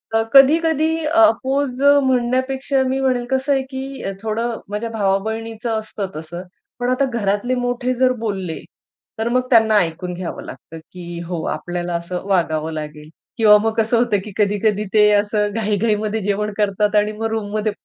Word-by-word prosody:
अ, 225 Hz, -, +4 dB
कधी-कधी 310 Hz, +3 st, +5 dB, 0.2 s
अपोज 275 Hz, -4 st, +2 dB, 0.2 s
म्हणण्यापेक्षा 260 Hz, +2 st, 0 dB
मी 265 Hz, +1 st, -1 dB
म्हणेल 255 Hz, -2 st, 0 dB
कसं 265 Hz, +2 st, 0 dB
आहे, 270 Hz, -, +1 dB
की 270 Hz, +1 st, -7 dB, 0.2 s
थोडं 225 Hz, +2 st, -2 dB
माझ्या 210 Hz, +3 st, -3 dB
भावा-बहिणीचं 220 Hz, +2 st, -2 dB
असतं 215 Hz, -2 st, -5 dB
तसं, 160 Hz, +3 st, -6 dB, 0.4 s
पण 245 Hz, -, -1 dB
आता 255 Hz, +2 st, +2 dB
घरातले 205 Hz, +5 st, 0 dB
मोठे 245 Hz, +1 st, -1 dB
जर 255 Hz, +1 st, +2 dB
बोलले 190 Hz, -6 st, -3 dB, 0.6 s
तर 220 Hz, -, -1 dB
मग 255 Hz, +1 st, 0 dB
त्यांना 225 Hz, -3 st, +5 dB
ऐकून 180 Hz, -1 st, -1 dB
घ्यावं 175 Hz, 0 st, -6 dB
लागतं, 165 Hz, -, -10 dB
की 175 Hz, -1 st, -8 dB
हो 170 Hz, -2 st, -4 dB
आपल्याला 175 Hz, +2 st, -4 dB
असं 170 Hz, +1 st, -4 dB
वागावं 160 Hz, -4 st, 0 dB
लागेल 150 Hz, 0 st, -7 dB, 0.3 s
किंवा 210 Hz, -2 st, +7 dB
मग 225 Hz, 0 st, 0 dB
कसं 225 Hz, +1 st, +2 dB
होतं, 230 Hz, -3 st, +2 dB
की 210 Hz, -, -8 dB
कधी-कधी 210 Hz, 0 st, +1 dB
ते 210 Hz, -1 st, +6 dB
असं 210 Hz, 0 st, +1 dB
घाई-घाईमध्ये 215 Hz, 0 st, 0 dB
जेवण 205 Hz, +1 st, -1 dB
करतात 210 Hz, 0 st, +1 dB
आणि 210 Hz, 0 st, +3 dB
मग 225 Hz, -, -3 dB
रूममध्ये 215 Hz, 0 st, -2 dB
220 Hz, 155 wpm, -20 LUFS, 200-250 Hz, 0.6 s, किंवा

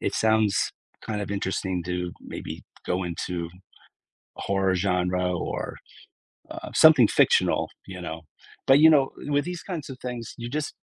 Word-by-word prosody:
it -, -, -1 dB
sounds 110 Hz, -2 st, +2 dB, 0.3 s
kinda 105 Hz, -2 st, -3 dB
interesting 95 Hz, -2 st, -2 dB
to 90 Hz, -1 st, -3 dB
maybe -, -, -7 dB, 0.2 s
go 90 Hz, +1 st, 0 dB
into 85 Hz, 0 st, -4 dB, 0.9 s
horror 95 Hz, -1 st, 0 dB
genre 90 Hz, -1 st, 0 dB, 0.3 s
or, -, -, -4 dB, 0.7 s
uh, -, -, -7 dB
something 150 Hz, -8 st, +7 dB
fictional, -, -, +3 dB, 0.2 s
you 90 Hz, -1 st, -8 dB
know. 80 Hz, -1 st, -6 dB, 0.5 s
But, 135 Hz, +1 st, +7 dB
you 160 Hz, +1 st, +8 dB
know, 140 Hz, -4 st, +4 dB, 0.2 s
with 145 Hz, 0 st, +2 dB
these 180 Hz, -1 st, -5 dB
kinds 170 Hz, -7 st, -5 dB
of 130 Hz, -, -7 dB
things, 120 Hz, -3 st, -6 dB
you 120 Hz, 0 st, -6 dB
just 150 Hz, +3 st, -3 dB
100 Hz, 145 wpm, -26 LUFS, 90-135 Hz, 0.9 s, you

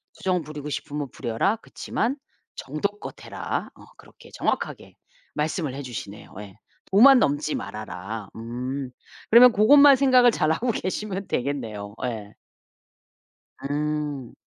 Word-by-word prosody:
투정 180 Hz, -3 st, -1 dB
부리고 150 Hz, 0 st, -7 dB
싶으면 145 Hz, -1 st, -4 dB
부려라. 125 Hz, -, -1 dB
그치만 235 Hz, +2 st, -3 dB, 0.4 s
정도껏 200 Hz, +9 st, -4 dB
해라." -, -, -4 dB
어 -, -, -15 dB
그렇게 -, -, -17 dB
정확하게 -, -, -3 dB, 0.4 s
말씀을 150 Hz, -2 st, -2 dB
해 140 Hz, -, -5 dB
주시네요. 110 Hz, -6 st, -8 dB
예. 100 Hz, -2 st, -10 dB, 0.4 s
"도만 255 Hz, +7 st, +8 dB
넘지 145 Hz, -2 st, 0 dB
말아라." 105 Hz, 0 st, -6 dB
음 125 Hz, +4 st, -5 dB, 0.4 s
그러면 245 Hz, +2 st, +9 dB
고것만 275 Hz, +6 st, +7 dB
생각을 255 Hz, -2 st, +5 dB
잘하고 165 Hz, +7 st, 0 dB
계시면 195 Hz, -1 st, -4 dB
되겠네요. 115 Hz, -7 st, -3 dB
예. 110 Hz, -4 st, -5 dB, 1.3 s
음. 150 Hz, -3 st, -3 dB
150 Hz, 270 characters per minute, -24 LUFS, 120-205 Hz, 1.3 s, 그러면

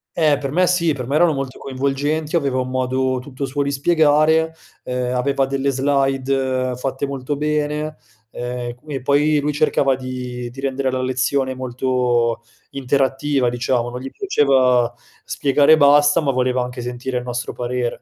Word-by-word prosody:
Eh, 155 Hz, -4 st, +3 dB
per 140 Hz, -1 st, -4 dB
me 180 Hz, +3 st, +3 dB
sì, 170 Hz, -3 st, +2 dB
per 125 Hz, -3 st, -5 dB
me 140 Hz, -, -1 dB
erano 165 Hz, -1 st, +4 dB
molto 135 Hz, -1 st, -5 dB
coinvolgenti, 140 Hz, +4 st, -2 dB
aveva 140 Hz, -5 st, +1 dB
un 130 Hz, 0 st, -2 dB
modo 130 Hz, 0 st, 0 dB
tutto 135 Hz, +1 st, -6 dB
suo 140 Hz, +2 st, -2 dB
di 140 Hz, 0 st, 0 dB
spiegare, 160 Hz, +1 st, +3 dB, 0.3 s
ehm, 125 Hz, 0 st, -2 dB
aveva 135 Hz, +2 st, +1 dB
delle 135 Hz, +1 st, -1 dB
slide 135 Hz, -1 st, 0 dB
fatte 135 Hz, +2 st, -3 dB
molto 140 Hz, +1 st, -4 dB
bene, 150 Hz, 0 st, -1 dB, 0.4 s
ehm, 125 Hz, 0 st, -4 dB
e 120 Hz, -, -7 dB
qu 150 Hz, +5 st, -20 dB
e 135 Hz, -3 st, -3 dB
poi 145 Hz, +3 st, +2 dB
lui 150 Hz, +1 st, -1 dB
cercava 140 Hz, -3 st, +2 dB
di 125 Hz, -1 st, -6 dB
di 130 Hz, +3 st, -12 dB
rendere 135 Hz, -1 st, -1 dB
la 130 Hz, 0 st, -2 dB
lezione 130 Hz, +1 st, 0 dB
molto 125 Hz, -2 st, 0 dB, 0.3 s
interattiva, 135 Hz, 0 st, 0 dB
diciamo, 120 Hz, 0 st, -1 dB
non 125 Hz, -, -6 dB
gli 135 Hz, -, -6 dB
piaceva 130 Hz, -, +2 dB, 0.3 s
spiegare 145 Hz, +2 st, +3 dB
e -, -, +6 dB
basta, 145 Hz, +2 st, +5 dB
ma 140 Hz, -2 st, +1 dB
voleva 125 Hz, 0 st, 0 dB
anche 125 Hz, 0 st, -6 dB
sentire 125 Hz, +1 st, -4 dB
il -, -, -8 dB
nostro 125 Hz, 0 st, -4 dB
parere. 120 Hz, 0 st, -3 dB
135 Hz, 170 wpm, -20 LUFS, 125-145 Hz, 0.4 s, e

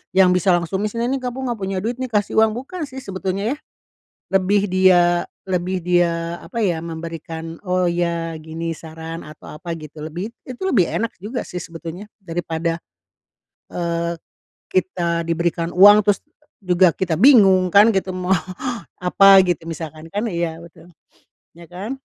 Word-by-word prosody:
yang 185 Hz, -1 st, +6 dB
bisa 180 Hz, 0 st, +3 dB
langsung 175 Hz, +2 st, -2 dB
nih, 215 Hz, -, 0 dB
sini 230 Hz, +2 st, -2 dB
nih 270 Hz, -, 0 dB
kamu 250 Hz, -1 st, -4 dB
enggak 240 Hz, -3 st, -3 dB
punya 190 Hz, 0 st, -2 dB
duit 240 Hz, +3 st, -3 dB
nih 255 Hz, -, -2 dB
kasih 210 Hz, 0 st, +1 dB
uang, 220 Hz, 0 st, +3 dB
bukan 300 Hz, +5 st, -5 dB
sih 265 Hz, -1 st, -9 dB
sebetulnya 195 Hz, +3 st, -2 dB
yah. 295 Hz, -, -10 dB, 0.8 s
Lebih 200 Hz, +2 st, +3 dB
dia, 185 Hz, -1 st, +5 dB, 0.4 s
lebih 185 Hz, 0 st, -1 dB
dia, 170 Hz, -1 st, +1 dB
apa 235 Hz, -, -7 dB
ya, 175 Hz, -7 st, 0 dB
memberikan, 165 Hz, 0 st, -7 dB
oh 185 Hz, -1 st, +1 dB
ya 170 Hz, -1 st, -1 dB
gini 165 Hz, +1 st, -4 dB
saran, 160 Hz, +1 st, -8 dB
atau 150 Hz, 0 st, -11 dB
apa 170 Hz, +3 st, -8 dB
gitu. 155 Hz, 0 st, -10 dB
Lebih, 175 Hz, +9 st, -6 dB
it 255 Hz, -2 st, -9 dB
itu 380 Hz, -, -3 dB
lebih 195 Hz, -, +2 dB
enak 230 Hz, 0 st, -2 dB
juga 235 Hz, +4 st, -4 dB
sih 180 Hz, -, -6 dB
sebetulnya. 170 Hz, +5 st, -8 dB
Daripada, 165 Hz, -2 st, -3 dB, 0.9 s
eee, 170 Hz, 0 st, -1 dB, 0.5 s
kita 170 Hz, -2 st, 0 dB
diberikan 170 Hz, 0 st, -1 dB
uang 205 Hz, +4 st, +8 dB
terus 205 Hz, -1 st, +3 dB, 0.4 s
juga 180 Hz, -1 st, +4 dB
kita 170 Hz, -1 st, -2 dB
bingung 190 Hz, -, +6 dB
kan 210 Hz, +3 st, +6 dB
gitu, 190 Hz, 0 st, 0 dB
mau 185 Hz, +1 st, +1 dB, 0.7 s
apa 195 Hz, +2 st, +7 dB
gitu 175 Hz, -2 st, 0 dB
misalkan, 160 Hz, 0 st, -7 dB
kan. 210 Hz, +3 st, -2 dB
Iya 170 Hz, -4 st, -2 dB
betul. 170 Hz, +1 st, -15 dB, 0.7 s
Ya 170 Hz, 0 st, -13 dB
kan? 205 Hz, +9 st, -5 dB
180 Hz, 160 wpm, -21 LUFS, 170-205 Hz, 0.9 s, uang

